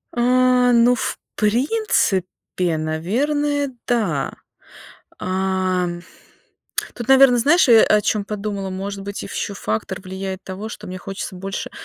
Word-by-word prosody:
А, 250 +1 +4
ну, 235 +1 +5
в - - -3 0.2
принципе, 210 - 0
наверное, 280 - -1 0.2
да. 195 - 0 0.9
А, 185 -1 0 1.1
тут, 240 0 -7
наверно, 265 -2 +7
знаешь, 295 +6 +4
э, 225 -2 +8
о 210 - +4
чем 210 -1 0
подумала, 205 -2 -4
может 195 +1 -5
быть, 200 +1 -6
ш - - -6
ещё 200 - -4
фактор 110 - -3
влияет 190 0 -5
того, 195 +3 -6
что - - -9
мне 185 0 -6
хочется 195 +1 -6
больше, 195 +2 -5
205 Hz, 125 wpm, -21 LUFS, 185-245 Hz, 1.1 s, э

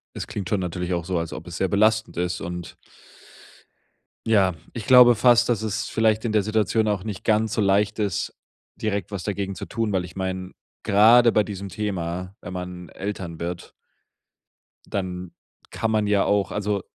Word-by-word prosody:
es - - -5
klingt 100 -4 -5
schon 105 - 0
natürlich 90 0 -3
auch 85 -1 -2
so, 90 0 -1
als 85 -2 -4
ob 80 +2 -7
es 85 0 -7
sehr 95 - 0
belastend 110 +2 +2
ist 90 +1 -2
und 90 0 -6 1.5
ja, 100 -5 +3 0.2
ich 115 - -6
glaube 125 -2 +8
fast, 120 +1 +5
dass 115 -3 +1
es 110 0 -2
vielleicht 110 0 +1
in 115 - 0
der 105 -2 +2
Situation 110 +1 +1
auch 105 -3 0
nicht 105 -3 -6
ganz 110 0 +2
so - - 0
leicht 100 +1 +2
ist, 100 -5 -2 0.4
direkt 100 -4 -2
was 100 -4 -5
dagegen 100 -1 -3
zu - - -6
tun, 110 -2 -2
weil 95 -2 0
ich 90 - -10
meine, 95 -1 -4 0.3
grade 115 +4 +6
bei 105 - +4
diesem 100 -1 -6
Thema, 90 -2 -4
wenn 90 - -8
man 90 -1 -6
Eltern 95 -5 -6
wird 85 0 -5 1.2
dann 90 -2 -4 0.4
kann 115 - -2
man 110 -1 +1
ja 100 -1 +3
auch 100 -3 +1
also, 105 -1 -1
100 Hz, 180 wpm, -24 LUFS, 90-110 Hz, 1.5 s, glaube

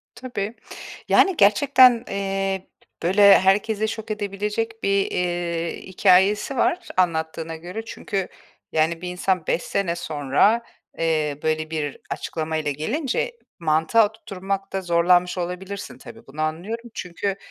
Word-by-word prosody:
Tabii. 230 -4 -5 0.5
Yani, 385 -4 +4
gerçekten, 245 +3 +5
eee, 195 -1 -2 0.4
böyle, 195 +3 +7
herkesi 210 +3 +2
şok 220 0 -6
edebilecek 210 +2 -3
bir, 200 0 +2
eee, 175 -1 -2
hikâyesi 195 +6 +3
var 355 +8 +1
anlattığına 160 -2 0
göre. 180 +7 -7
Çünkü, 195 -4 -4 0.4
yani, 160 +1 +1
bir 180 - -4
insan 180 -1 -1
5 170 - 0
sene 175 -3 -1
sonra, 155 - +2 0.4
eee, 155 -3 0
böyle, 155 0 -1
bir 150 -3 -3
açıklamayla 155 -2 -3
gelince 270 - -2 0.2
mantığa 165 +7 +3
oturtmakta 195 -2 -5
zorlanmış 175 +1 +3
olabilirsin, 185 +3 -5
tabii, - - -13
bunu 145 +3 -9
anlıyorum. 210 +10 -4
Çünkü, 190 +2 -3
190 Hz, 115 wpm, -23 LUFS, 165-210 Hz, 0.5 s, böyle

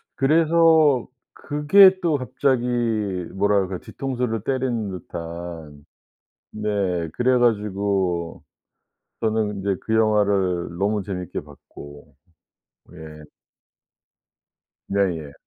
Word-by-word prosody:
그래서 160 -2 +3 0.3
그게 185 +7 +5
또 165 -4 +1
갑자기 130 0 0 0.7
뭐랄까 95 -1 +1
뒤통수를 125 -5 -4
때리는 125 -4 -2
듯한 85 -4 -8 0.7
네. 100 -5 -2
그래 125 +1 +2
가지고 100 -6 -1 0.8
저는 110 -1 0
근데 100 0 0
그 110 - -1
영화를 100 -6 +1
너무 100 +2 0
재밌게 90 -2 -5
봤고. 75 0 -14 0.8
예. 75 -1 -12 1.6
예예. 85 -7 -1
100 Hz, 175 characters per minute, -22 LUFS, 85-125 Hz, 1.6 s, 그게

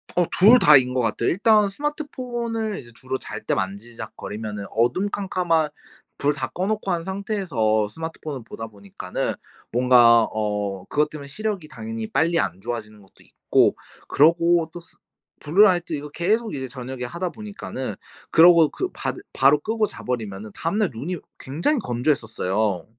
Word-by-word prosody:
어 180 - +3
둘 220 +7 +6
다인 130 - +6
거 130 - 0
같아요. 115 0 0
일단 210 +3 +4
스마트폰을 240 -5 -3
이제 120 - -13
주로 130 +3 -4
잘 - - -7
때 - - +1
만지작거리면은 105 +1 -5
어둠 120 - +1
캄캄한 175 -6 0 0.5
불 145 +1 +1
다 145 - -3
꺼 185 +2 -2
놓고 215 -2 -1
한 170 -1 0
상태에서 175 - 0
스마트폰을 155 0 -6
보다 115 0 -7
보니까는 100 -3 -5 0.4
뭔가 120 -1 +6
어 105 -3 -2
그것 150 +1 +1
때문에 145 -2 -9
시력이 200 +1 -4
당연히 220 +8 -6
빨리 170 -3 +2
안 90 -2 -1
좋아지는 110 -2 -6
것도 95 - -21
있고 - - +2 0.3
그리고 170 +2 +4
또 175 - -7
수 165 -1 -15 0.4
블루라이트 175 +1 +3
이거 150 -1 -4
계속 210 +9 0
이제 130 -2 -4
저녁에 125 0 -7
하다 170 +8 -3
보니까는 205 -11 -6 0.3
그러고 165 -1 +7
그 375 - -4
바 - - -3 0.2
바로 140 +2 +5
끄고 220 +6 0
자 - - -11
버리면은 110 -4 -4
다음날 200 +4 -1
눈이 160 +11 -4 0.2
굉장히 170 - 0
건조했었어요. 110 - -1
150 Hz, 345 characters per minute, -23 LUFS, 115-190 Hz, 0.5 s, 그러고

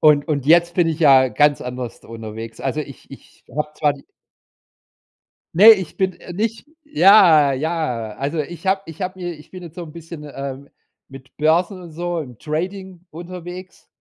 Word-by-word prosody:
Und 150 -1 +4
und 140 -3 -1
jetzt 170 +1 +4
bin 175 -2 +3
ich 160 0 -3
ja 135 -4 +6
ganz 145 +2 +2
anders 125 -1 -6
d - - -19
unterwegs. 115 0 -8
Also, 135 +3 -2
ich 140 -2 -11
ich 135 - -15
habe 150 +1 -2
zwar 150 -1 +1
die 140 -1 -14 1.5
Ne, 210 +5 +9
ich 190 -6 0
bin 190 -1 0
äh, 175 - -10
nicht. 225 +6 -3 0.2
Ja, 190 - +6
ja, 140 -6 -2
also, 145 +4 -2
ich 175 +5 -6
habe 190 +1 +2
ich 165 +3 -10
habe 185 0 -5
mir 175 -1 -4
ich 150 -1 -16
bin 185 -1 -9
jetzt 170 -2 -11
so 175 - -6
’n 155 - -11
bisschen, 165 -1 -10
ähm, 140 0 -7 0.4
mit 135 -1 -14
Börsen 170 +5 +1
und 170 -2 -11
so 175 +1 -3
im 125 -7 -9
Trading 180 +3 -5
unterwegs. 180 +2 -9
160 Hz, 185 wpm, -20 LUFS, 140-180 Hz, 1.5 s, Ne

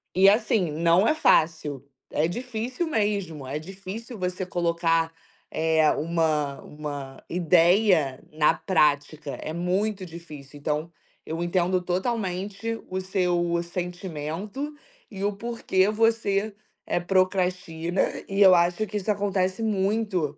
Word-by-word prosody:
E 190 +2 +7
assim, 215 -4 +2
não 170 +6 +3
é 310 - +3
fácil, 155 - +2 0.3
é 155 - +1
difícil 245 - -3
mesmo, 200 - -1
é 140 +3 -3
difícil 195 +7 -8
você 180 0 -2
colocar, 170 -2 +1 0.4
eh, 160 -1 +3
uma 155 -3 0
uma 145 -3 -7
ideia 175 -4 +3
na 155 +1 +3
prática, 150 -4 +1
é 155 - -5
muito 190 +4 -1
difícil, 155 -5 -11
então, 150 +3 -2 0.3
eu 165 +1 -4
entendo 180 +1 +1
totalmente 195 +3 -2
o 185 0 -3
seu 175 -3 0
sentimento 180 - -5 0.3
e 195 -2 -6
o 205 - +2
porquê 205 -3 0
você, 215 -2 +1 0.3
eh, - - +1
procastina 180 -2 0 0.3
e 195 +1 -1
eu 190 -2 +9
acho 175 +5 +2
que 210 - -3
isso 210 +1 0
acontece 195 0 0
muito 195 -7 0
180 Hz, 120 wpm, -25 LUFS, 160-200 Hz, 0.4 s, eu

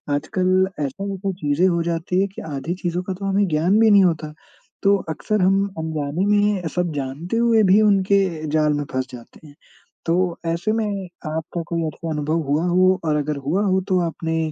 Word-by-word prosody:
आजकल 185 +5 +1 0.2
ऐसा-वैसा 195 +6 -4
चीज़ें 150 +5 +2
हो 170 -2 +1
जाती 170 +2 -1
हैं 200 - +1
कि - - -6
आधी 150 +5 -3
चीज़ों 175 +1 -1
का 190 - -4
तो 195 +2 -7
हमें 195 0 +2
ज्ञान 170 +8 +2
भी 220 -1 +5
नहीं 200 -1 +7
होता। 155 -3 0 0.5
तो 200 0 +5
अक्सर 210 +6 -1
हम 195 +2 +3
अनजाने 160 +2 -2
में 205 -3 +2
सब 180 -2 0
जानते 145 +10 -3
हुए 230 -2 +4
भी 195 +3 +5
उनके 200 -1 +3 0.3
जाल 155 -1 +2
में 145 0 -1
फँस 130 0 -2
जाते 125 +5 -13
हैं। 145 - -16 0.5
तो 165 +1 +2 0.3
ऐसे 170 +6 -1
में 220 -1 0 0.4
आपका 160 +2 -4
कोई 170 -1 -1
ऐसा 160 +2 -6
अनुभव 155 +2 -1
हुआ 155 +4 +1
हो 185 +1 +3
और 150 -1 +1
अगर 150 0 -1
हुआ 190 +7 +1
हो 190 0 +2
तो 185 -1 +3
आपने 165 0 -3
175 Hz, 190 wpm, -21 LUFS, 155-195 Hz, 0.5 s, नहीं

